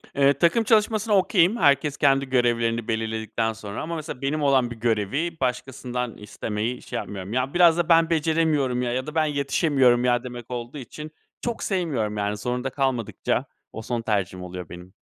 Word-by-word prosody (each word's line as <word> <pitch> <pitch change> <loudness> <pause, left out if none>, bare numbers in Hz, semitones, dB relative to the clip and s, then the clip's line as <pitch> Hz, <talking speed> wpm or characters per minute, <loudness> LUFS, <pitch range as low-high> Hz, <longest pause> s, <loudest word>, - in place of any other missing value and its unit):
Eee, 140 0 +5
takım 170 +8 +3
çalışmasına 215 0 +2
okay'im. 190 +1 +3
Herkes 140 - +3
kendi 135 -1 +3
görevlerini 120 -2 +1
belirledikten 110 0 -2
sonra 105 -2 -7
ama 170 +2 -4
mesela 155 -5 -6
benim 145 +3 -1
olan 130 -4 +3
bir - - -5
görevi 120 - -1
başkasından 125 -1 -3
istemeyi 110 +3 -4
şey - - -5
yapmıyorum. 100 0 -6
Ya, 130 +2 -1
biraz 175 -2 +5
da 175 -1 0
ben 165 -1 +5
beceremiyorum 155 -6 +1
ya 120 - -1
ya 130 +3 -2
da 150 - -7
ben 160 -1 +3
yetişemiyorum 140 -4 +2
ya 120 0 +2
demek 120 -1 -8
olduğu 120 +3 -5
için 150 +4 -8 0.3
çok 235 -1 -3
sevmiyorum. 135 - -1
Yani, 105 0 -1
zorunda 125 +4 -2
kalmadıkça 130 -4 -1 0.3
o 110 - -6
son 120 +1 -3
tercihim 95 -4 -2
oluyor 90 -1 -7
benim. 90 +1 -11
125 Hz, 170 wpm, -24 LUFS, 115-155 Hz, 0.3 s, Eee